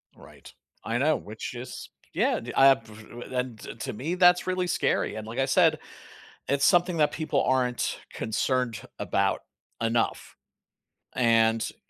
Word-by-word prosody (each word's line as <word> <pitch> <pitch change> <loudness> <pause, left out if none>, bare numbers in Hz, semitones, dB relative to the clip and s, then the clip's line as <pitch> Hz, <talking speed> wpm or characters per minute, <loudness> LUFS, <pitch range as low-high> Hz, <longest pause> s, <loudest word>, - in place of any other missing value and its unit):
Right. - - -15 0.3
I 115 +2 -1
know, 150 +4 +3
which 110 +3 -7
is, 120 +1 -8 0.2
yeah, - - +1
d - - -7
I 135 - +7
have 125 -4 +4
p 110 - -15 0.4
and 125 -3 -3
to - - -9
to 110 - -5
me 155 +11 -3
that's 180 0 +5
really 185 -1 0
scary, - - 0
and, 110 0 -6
like 115 +4 -6
I 135 - +3
said, 155 +2 +3 0.7
it's 140 0 +1
something 175 -1 +3
that 150 - +3
people 155 -1 0
aren't 125 -2 0
concerned 115 0 -1 0.2
about - - 0 0.4
enough, 115 0 -1 0.8
and 115 -2 +3
I - - -25
130 Hz, 155 wpm, -27 LUFS, 115-155 Hz, 0.8 s, I